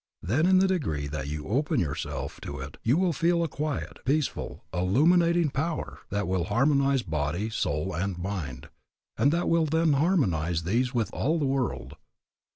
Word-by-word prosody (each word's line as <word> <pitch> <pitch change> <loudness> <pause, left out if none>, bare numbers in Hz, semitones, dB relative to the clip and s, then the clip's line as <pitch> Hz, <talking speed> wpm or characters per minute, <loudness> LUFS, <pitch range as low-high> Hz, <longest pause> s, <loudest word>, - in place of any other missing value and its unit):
Then 125 - +2
in 185 0 +5
the 190 +1 +4
degree 105 - -1
that 70 -1 -4
you 75 0 -4
open 145 - +1
yourself 75 -5 -3
to 70 - -6
it 70 +1 -8
you 125 +7 +2
will 180 -2 +2
feel 170 +3 +2
a - - 0
quiet, 150 -1 -4
peaceful, 150 +2 -1
illuminating 165 - +3
power 160 +5 -3
that 100 -1 -1
will 90 -2 0
harmonize 135 +4 +2
body, 80 +7 -2
soul, 90 -3 -1
and 95 +2 -2
mind, 85 -9 -5 0.5
and 140 - +3
that 170 +2 0
will 165 -1 +3
then 160 0 +2
harmonize 90 - +1
these 120 +8 +1
with 120 -4 -1
all 155 +5 +1
the 150 - 0
world. 135 -2 -2
130 Hz, 165 wpm, -27 LUFS, -, 0.5 s, in